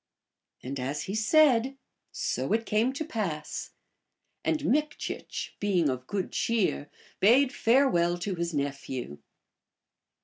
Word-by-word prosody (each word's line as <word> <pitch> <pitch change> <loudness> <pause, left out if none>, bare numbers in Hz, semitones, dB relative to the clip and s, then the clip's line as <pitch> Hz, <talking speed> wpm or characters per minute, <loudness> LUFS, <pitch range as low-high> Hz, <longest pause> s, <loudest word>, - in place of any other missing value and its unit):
And 135 +2 -4
as 135 +4 -2
he 195 - -5
said, 265 +2 +4 0.3
so - - -1
it 225 +1 +1
came 220 +5 +2
to 310 +3 -4
pass; 200 - -3 0.7
and 310 -2 0
Mikchich, 300 +2 -2
being 185 -7 +2
of 130 -1 -4
good 195 -3 -2
cheer, 205 -10 0 0.3
bade 255 +6 +5
farewell 225 -11 +3
to 185 +3 -3
his 170 -1 -2
nephew. 140 - -4
205 Hz, 115 wpm, -28 LUFS, 150-255 Hz, 0.7 s, bade